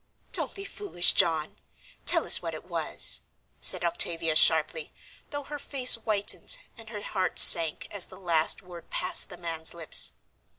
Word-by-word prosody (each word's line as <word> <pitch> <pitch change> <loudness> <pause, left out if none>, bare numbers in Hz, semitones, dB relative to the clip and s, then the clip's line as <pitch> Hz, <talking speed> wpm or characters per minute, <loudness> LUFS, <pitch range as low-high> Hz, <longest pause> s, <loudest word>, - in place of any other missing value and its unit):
"Don't - - -3
be 395 - -11
foolish, 400 - +1
John. 165 -5 -2 0.5
Tell - - 0
us - - +5
what - - -8
it - - -13
was," - - +2 0.4
said - - +5
Octavia 165 -1 -3
sharply, 160 - +1 0.4
though 290 0 -8
her 295 +1 -10
face 270 -2 +2
whitened 215 - -1 0.2
and 225 -2 -15
her 210 -2 -10
heart 185 -2 -5
sank 165 -2 +6
as 205 -3 -4
the 185 - -17
last 170 -1 -2
word 175 -2 -15
passed 185 0 -3
the 180 - -13
man's 165 -1 -5
lips. 165 -2 +3
180 Hz, 160 wpm, -24 LUFS, 165-225 Hz, 0.5 s, sank